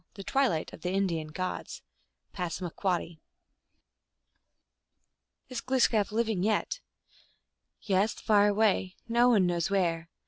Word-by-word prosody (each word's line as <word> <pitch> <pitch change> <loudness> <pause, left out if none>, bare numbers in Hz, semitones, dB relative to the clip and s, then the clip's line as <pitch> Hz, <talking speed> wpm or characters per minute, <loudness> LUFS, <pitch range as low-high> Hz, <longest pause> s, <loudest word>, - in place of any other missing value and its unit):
The 195 - -8
Twilight 250 - 0
of - - -11
the 180 - -2
Indian 180 -5 0
Gods. 185 +4 -5 0.5
(Passamaquoddy.) 175 -1 -3 2.3
"Is 255 -3 -5
GloosJcap 235 -6 +2
living 220 -3 0
yet?" 220 - 0 0.5
" - - -47 0.3
Yes, 200 +2 +2
far 205 -1 +3
away; 205 -3 +1
no 235 +1 +4
one 210 -6 +4
knows 175 0 0
where. 170 -4 0
195 Hz, 110 wpm, -29 LUFS, 175-220 Hz, 2.3 s, no